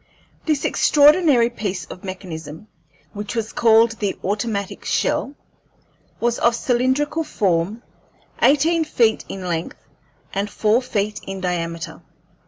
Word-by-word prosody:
This 305 -3 +1
extraordinary 290 -5 +4
piece 200 -5 -4
of 180 - -11
mechanism, 175 -2 -8 0.5
which 205 +2 -5
was 225 -1 -3
called 225 0 +5
the 200 -2 -1
automatic 200 0 -2
shell, 280 - 0 0.8
was 240 0 0
of 235 0 +3
cylindrical 260 +6 0
form, 195 - -1 0.6
eighteen 320 +4 +4
feet 230 -7 +2
in 190 -1 -6
length 165 -1 -3 0.6
and 200 +1 -1
four 215 +4 +2
feet 210 -4 -2
in 195 0 -5
diameter. 170 -2 -3
220 Hz, 115 wpm, -21 LUFS, 190-255 Hz, 0.8 s, called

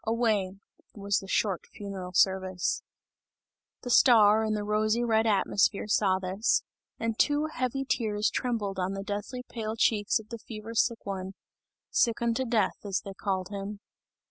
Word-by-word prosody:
Away," 220 -5 0 0.4
was 200 -2 0
the 195 - -10
short 190 -1 0
funereal 195 -3 -6
service. 190 -1 +1 1.0
The 245 - -3
star 220 -4 +6
in 215 -1 0
the 210 - -2
rosy 215 +3 +1
red 225 -1 +2
atmosphere 200 0 +2
saw 200 -2 +3
this, 190 +4 0 0.4
and 230 -1 -2
two 295 +1 +3
heavy 255 +2 -2
tears 210 -4 0
trembled 210 -6 -2
on 185 +1 -1
the 195 0 -4
deathly 205 +5 -5
pale 220 -1 -4
cheeks 215 -2 +2
of 215 -1 -10
the 230 -1 -6
fever 220 0 -8
sick 230 0 +1
one 190 -1 -4 0.6
sick 230 -1 +2
unto 235 +2 0
death, 225 -5 +1
as 195 -2 -1
they 195 - -8
called 190 -1 -2
him. 200 0 -6
210 Hz, 155 wpm, -28 LUFS, 195-230 Hz, 1.0 s, star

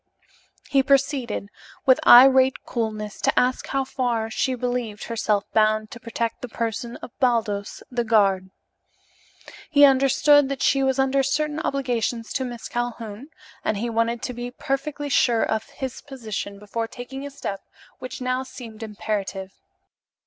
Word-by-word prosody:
He 275 -2 +3
proceeded, 265 -6 +1 0.4
with 260 -1 +5
irate 260 +1 +7
coolness, 215 -3 -4
to - - +3
ask 255 +1 0
how 275 0 0
far 240 -4 -2
she 260 +3 0
believed 245 -4 -3
herself 215 -3 0
bound 215 0 +2
to 240 - -9
protect 230 0 -3
the 250 - -6
person 230 +1 -3
of - - -8
Baldos, 220 -5 0
the 245 -1 0
guard. 195 -4 +2 1.2
He 290 -2 +7
understood 275 +1 +5
that 275 -1 -3
she 275 - +3
was 265 -1 +1
under 270 0 +2
certain 300 +3 -1
obligations 245 -6 -2
to 265 - -1
Miss 240 -2 -6
Calhoun 240 0 -4 0.4
and 215 - 0
he 235 +3 -2
wanted 230 +1 0
to 250 - -3
be 240 +1 -5
perfectly 280 +3 -3
sure 240 -4 +3
of 220 0 -2
his 265 -4 -6
position 220 -7 -6
before 215 +3 -4
taking 255 +3 -8
a 285 - -5
step 200 -8 -5 0.4
which 255 +3 -7
now 255 +1 0
seemed 235 -4 -10
imperative. 205 -3 -4
240 Hz, 150 wpm, -24 LUFS, 220-265 Hz, 1.2 s, irate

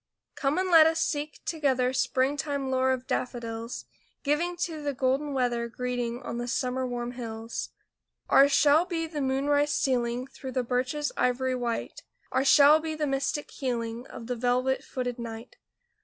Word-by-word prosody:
Come 280 +2 0
and 370 0 0
let 320 -2 +9
us 325 0 +1
seek 295 0 -2
together 260 -5 +1
Springtime 275 +1 0
lore 260 0 +2
of 260 -1 -2
daffodils, 235 -3 -4 0.4
Giving 335 +5 0
to 320 -4 -2
the 285 -2 -2
golden 270 +3 0
weather 245 -3 0
Greeting 245 0 -3
on 235 - -4
the 240 - -3
sun 255 +1 -1
warm 240 0 -3
hills. 230 -2 -5 0.6
Ours 280 +1 +6
shall 295 +4 +5
be 330 -3 -2
the 310 -2 -4
moonrise 285 +2 +1
stealing 245 -1 0
Through 265 -1 -9
the 255 - 0
birches 255 +5 -1
ivory 255 +1 +1
white; 240 -2 -3 0.3
Ours 265 +1 +1
shall 295 +2 +7
be 315 0 -4
the 305 -1 -1
mystic 275 +1 -2
healing 235 -2 -3
Of 230 - -9
the 245 +1 -2
velvet 250 +2 +1
footed 250 -1 -4
night. 230 0 -8
260 Hz, 160 wpm, -28 LUFS, 245-290 Hz, 0.6 s, let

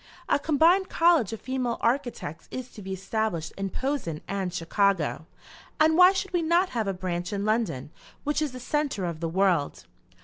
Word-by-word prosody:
A - - +2
combined 330 +6 +3
college 330 - +3
of 225 - -6
female 255 -2 -2
architects 235 - -2
is 255 -1 -6
to 210 - -11
be 190 0 -7
established 190 -3 -2
in 195 0 -3
Posen 260 - -3
and 195 -2 -2
Chicago, 170 -2 0 0.5
and 315 0 +5
why 360 +2 +8
should 385 0 -3
we 350 - +2
not 340 +3 +2
have 225 -4 -2
a - - +1
branch 175 -1 -3
in 200 0 -2
London, 215 - -1 0.3
which 295 +1 0
is 300 -3 -1
the 255 - -8
centre 275 - -1
of 170 -2 -4
the 165 -1 -2
world?" 180 -4 +1
220 Hz, 180 wpm, -27 LUFS, 185-295 Hz, 0.5 s, why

